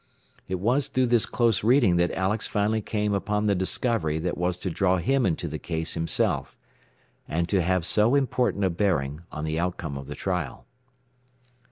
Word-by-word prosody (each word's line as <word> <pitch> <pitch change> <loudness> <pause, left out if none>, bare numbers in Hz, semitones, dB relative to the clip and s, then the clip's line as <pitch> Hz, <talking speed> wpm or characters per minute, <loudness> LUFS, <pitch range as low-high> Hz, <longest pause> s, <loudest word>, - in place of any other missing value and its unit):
It 95 0 -3
was 125 +8 +1
through 130 0 +1
this 115 - +4
close 115 -4 +1
reading 115 -6 +4
that 85 0 +2
Alex 100 +4 0
finally 105 +1 0
came 105 0 -1
upon 105 +1 -1
the 105 - +3
discovery 95 -3 0
that 85 +2 -2
was 90 0 -1
to 90 0 -4
draw 95 +2 +2
him 125 +8 +1
into 85 -1 -1
the 80 0 -5
case 80 -1 -3
himself, 80 0 -1 0.7
and 85 +2 -1
to 95 -1 +2
have 90 0 +1
so 110 +7 +3
important 125 -6 +1
a 95 - +2
bearing 80 -6 0
on 75 - -5
the 80 +1 -1
outcome 85 -5 -3
of 70 - -9
the 75 - -6
trial. 90 -2 -3
95 Hz, 180 wpm, -26 LUFS, 85-105 Hz, 0.7 s, this